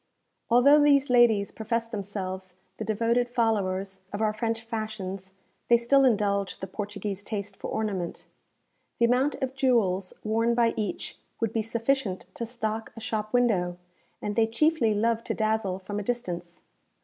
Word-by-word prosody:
Although 275 Hz, +5 st, +6 dB
these 280 Hz, -2 st, +4 dB
ladies 230 Hz, -5 st, +4 dB
profess 230 Hz, +1 st, -2 dB
themselves 190 Hz, -4 st, -5 dB, 0.2 s
the -, -, -4 dB
devoted 230 Hz, +3 st, +1 dB
followers 195 Hz, -5 st, 0 dB
of 205 Hz, -, -4 dB
our 215 Hz, -1 st, +1 dB
French 225 Hz, +1 st, -2 dB
fashions, 210 Hz, -4 st, -5 dB, 0.3 s
they 235 Hz, -, +6 dB
still 270 Hz, +4 st, +4 dB
indulge 200 Hz, -5 st, +1 dB
the -, -, -4 dB
Portuguese 205 Hz, 0 st, -5 dB
taste 200 Hz, -1 st, -5 dB
for -, -, -6 dB
ornament. 200 Hz, -6 st, -3 dB, 0.7 s
The 235 Hz, -, +4 dB
amount 255 Hz, +5 st, +2 dB
of 260 Hz, 0 st, -2 dB
jewels 220 Hz, -9 st, +1 dB
worn 230 Hz, +2 st, +1 dB
by 230 Hz, -1 st, +3 dB
each 205 Hz, -5 st, -4 dB, 0.2 s
would 225 Hz, -1 st, -1 dB
be 225 Hz, -, +1 dB
sufficient 230 Hz, -3 st, -1 dB
to 235 Hz, -, -4 dB
stock 220 Hz, -2 st, -3 dB
a -, -, -8 dB
shop 215 Hz, -1 st, -3 dB
window; 195 Hz, -8 st, +2 dB, 0.5 s
and 205 Hz, 0 st, -2 dB
they 225 Hz, -1 st, +4 dB
chiefly 235 Hz, -2 st, +2 dB
love 230 Hz, +2 st, +1 dB
to -, -, -2 dB
dazzle 215 Hz, -4 st, 0 dB
from 205 Hz, +2 st, -5 dB
a -, -, -4 dB
distance. 175 Hz, -7 st, -4 dB
220 Hz, 155 wpm, -27 LUFS, 200-235 Hz, 0.7 s, Although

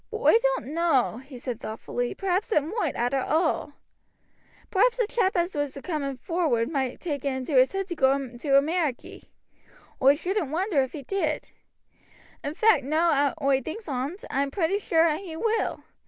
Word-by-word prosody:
But 440 Hz, -, -4 dB
oi 455 Hz, -, +4 dB, 0.2 s
doan't 280 Hz, -, -6 dB
know," 320 Hz, -9 st, +2 dB
he 265 Hz, +1 st, -11 dB
said 245 Hz, -2 st, -5 dB
thoughtfully, 240 Hz, +2 st, -4 dB
"perhaps 390 Hz, +3 st, -1 dB
it 300 Hz, -, +3 dB
moight, 335 Hz, -, -2 dB
arter 245 Hz, +3 st, 0 dB
all. 310 Hz, +1 st, 0 dB, 1.0 s
Perhaps 465 Hz, +5 st, +3 dB
the 475 Hz, -, +2 dB
chap 410 Hz, -4 st, 0 dB
as 345 Hz, +2 st, 0 dB
was 290 Hz, -2 st, -2 dB
a -, -, -7 dB
coomin' 280 Hz, -6 st, -3 dB
forward 290 Hz, -6 st, 0 dB
moight 265 Hz, -4 st, -2 dB
take 290 Hz, -6 st, -4 dB
it -, -, -1 dB
into 260 Hz, +2 st, -3 dB
his 255 Hz, 0 st, +5 dB
head 390 Hz, -1 st, -3 dB
to 345 Hz, -, -3 dB
go 270 Hz, -2 st, +3 dB
to 275 Hz, +1 st, 0 dB
Ameriky. 305 Hz, -2 st, -1 dB, 0.8 s
Oi 275 Hz, +2 st, +6 dB
shouldn't 360 Hz, 0 st, -2 dB
wonder 340 Hz, -1 st, +1 dB
if 260 Hz, -, -3 dB
he 290 Hz, -, -7 dB
did, 310 Hz, -2 st, -2 dB, 0.9 s
In 290 Hz, +2 st, -4 dB
fact, 430 Hz, -10 st, +4 dB
now 290 Hz, -1 st, +2 dB
oi 270 Hz, -1 st, +3 dB
thinks 395 Hz, -, -7 dB
on't, 285 Hz, -, -3 dB
oi -, -, -5 dB
am 280 Hz, 0 st, +1 dB
pretty 355 Hz, +5 st, 0 dB
sure 330 Hz, -5 st, +3 dB
as 310 Hz, -2 st, +1 dB
he 360 Hz, -5 st, -8 dB
will. 445 Hz, +6 st, -1 dB
305 Hz, 185 wpm, -26 LUFS, 270-360 Hz, 1.0 s, Oi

